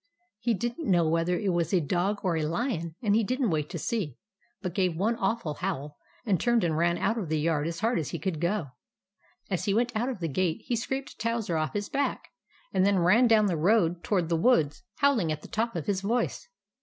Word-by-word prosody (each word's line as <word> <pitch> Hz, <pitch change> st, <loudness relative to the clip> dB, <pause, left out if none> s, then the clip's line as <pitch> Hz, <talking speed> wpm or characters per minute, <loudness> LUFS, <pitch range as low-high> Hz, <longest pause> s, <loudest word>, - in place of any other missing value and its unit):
He 235 Hz, 0 st, +1 dB
did 240 Hz, -, -3 dB
n't 320 Hz, -, -4 dB
know 175 Hz, -3 st, +3 dB
whether 165 Hz, +2 st, +1 dB
it 195 Hz, -2 st, 0 dB
was 170 Hz, -2 st, 0 dB
a 190 Hz, -, +4 dB
dog 180 Hz, +6 st, 0 dB
or 180 Hz, -3 st, +1 dB
a 160 Hz, -, 0 dB
lion; 170 Hz, -, -2 dB
and 205 Hz, -2 st, +3 dB
he 225 Hz, -, +3 dB
didn't 255 Hz, -1 st, 0 dB
wait 150 Hz, -2 st, -1 dB
to -, -, -5 dB
see, 170 Hz, -, -2 dB, 0.4 s
but 180 Hz, -4 st, -4 dB
gave 185 Hz, -3 st, +1 dB
one 210 Hz, +7 st, +1 dB
awful 195 Hz, -5 st, -1 dB
howl 150 Hz, -4 st, -4 dB, 0.3 s
and 195 Hz, -6 st, +2 dB
turned 235 Hz, 0 st, +2 dB
and 165 Hz, -3 st, +1 dB
ran 170 Hz, +2 st, +2 dB
out 225 Hz, +1 st, 0 dB
of 180 Hz, -7 st, -4 dB
the 155 Hz, -1 st, +1 dB
yard 155 Hz, -1 st, +1 dB
as 165 Hz, +2 st, -4 dB
hard 230 Hz, -1 st, +2 dB
as 155 Hz, -, -3 dB
he -, -, -3 dB
could 175 Hz, -6 st, -3 dB
go. 170 Hz, -6 st, -1 dB, 0.8 s
As 185 Hz, -, -1 dB
he 200 Hz, -, +1 dB
went 240 Hz, +1 st, +1 dB
out 240 Hz, +4 st, 0 dB
of 245 Hz, -7 st, -4 dB
the 170 Hz, -, -1 dB
gate 165 Hz, +2 st, -1 dB
he 240 Hz, -, 0 dB
scraped 265 Hz, +4 st, -4 dB
Towser 230 Hz, -6 st, -1 dB
off 155 Hz, -3 st, -1 dB
his 205 Hz, 0 st, -2 dB
back, 280 Hz, 0 st, -2 dB, 0.4 s
and 185 Hz, -, +3 dB
then 200 Hz, 0 st, +3 dB
ran 195 Hz, +8 st, +5 dB
down 220 Hz, -2 st, +5 dB
the 185 Hz, -4 st, +1 dB
road 175 Hz, 0 st, +2 dB
toward 185 Hz, -5 st, +1 dB
the 165 Hz, -, +1 dB
woods, 160 Hz, -, +2 dB
howling 245 Hz, -, +2 dB
at 155 Hz, 0 st, -4 dB
the -, -, -9 dB
top 230 Hz, 0 st, -2 dB
of 165 Hz, -, -3 dB
his 195 Hz, -2 st, 0 dB
voice. 235 Hz, -, -1 dB
190 Hz, 235 wpm, -28 LUFS, 165-230 Hz, 0.8 s, ran